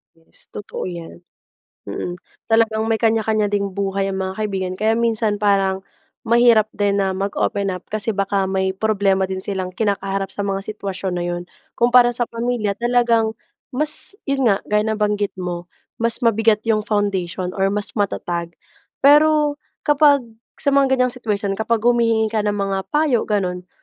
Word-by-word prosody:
Yes, 165 0 -9
totoo 205 - -6
yan. 170 -1 -8 0.7
Mm, 175 - -4 0.3
talagang 225 -1 +2
may 225 - +2
kanya-kanya 220 -2 +1
ding 200 -2 -1
buhay 195 -1 -1
ang 190 - -3
mga 190 - -3
kaibigan. 190 -3 -2
Kaya 220 +1 +2
minsan 225 -2 +1
parang 195 -2 +1 0.4
mahirap 230 -2 +4
din 200 -1 +1
na 190 - 0
mag-open 200 +1 -1
up 180 - -7
kasi 215 0 -1
baka 195 0 0
may 190 0 0
problema 195 -1 +1
din 190 0 -5
silang 185 -2 -4
kinakaharap 195 -2 -1
sa - - -12
mga 195 0 -2
sitwasyon 195 -3 -4
na 175 - -2
'yon. 175 0 -3 0.3
Kumpara 240 0 +4
sa 240 - +1
pamilya 235 -2 -2
talagang 235 -2 +2 0.4
mas 305 +7 0
'yon 275 -3 +1
nga, 200 -3 +2
gaya 210 +1 0
ng 220 - 0
banggit 210 -1 -1
mo, 175 -1 -5 0.3
mas 230 +2 +1
mabigat 225 -1 +3
'yong 215 -2 0
foundation 190 -4 -1
or 195 +1 0
mas 205 +1 -2
matatag. 170 -4 -2 0.5
Pero 295 0 +5 0.2
kapag 290 -2 +4 0.3
sa 280 - 0
mga 275 -1 +4
ganyang 250 -1 +2
situation, 210 -5 -2
kapag 220 0 0
humihingi 230 -2 +2
ka 220 - 0
ng 210 0 0
mga 195 -1 -2
payo 295 -6 +1
gano'n, 180 -4 -1
210 Hz, 160 wpm, -20 LUFS, 195-230 Hz, 0.7 s, Pero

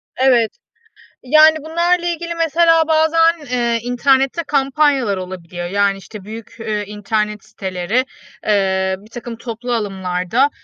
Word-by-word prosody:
Evet. 250 -4 +3 0.7
Yani, 310 +4 +6
bunlarla 340 +2 +1
ilgili 340 0 -3
mesela 330 0 +3
bazen, 325 +1 +3
eee, 240 -2 0
internette 270 +5 +1
kampanyalar 275 -6 +1
olabiliyor. 180 -1 -6
Yani, 200 +1 +1
işte, 195 +2 -11
büyük, 220 +2 -10
ııı, 215 -2 -2
internet 210 0 -3
siteleri, 200 +3 -2 0.4
ııı, 190 -2 +1
birtakım 235 +1 -8
toplu 240 +1 -5
alımlarda, 195 +3 0
235 Hz, 115 wpm, -18 LUFS, 200-305 Hz, 0.7 s, Yani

